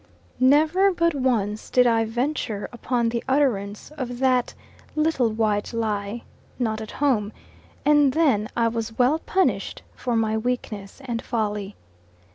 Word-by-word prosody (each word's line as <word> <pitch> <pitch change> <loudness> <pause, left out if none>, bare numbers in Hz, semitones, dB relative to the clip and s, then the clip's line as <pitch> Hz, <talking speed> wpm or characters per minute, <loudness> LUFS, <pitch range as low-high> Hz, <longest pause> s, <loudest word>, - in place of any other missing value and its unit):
NEVER 310 +9 +4
but 335 -1 +2
once 225 -6 -1
did 250 -1 +4
I 225 -1 +3
venture 235 -2 -2
upon 240 0 0
the 235 0 -3
utterance 230 -6 0
of 245 -2 -4
that 255 -1 +1 0.4
little 305 -6 +2
white 215 -1 -1
lie, 215 0 -2 0.3
"Not 220 -3 -1
at 215 - -7
home," 235 -8 +1 0.5
and 295 -2 +5
then 260 -9 +2
I 230 -1 +3
was 225 -1 -3
well 260 +6 +3
punished 380 +3 0
for 245 -2 -2
my 220 -1 +1
weakness 220 -1 -4
and 235 -2 -3
folly. 210 -4 -3
235 Hz, 135 wpm, -24 LUFS, 220-270 Hz, 0.5 s, and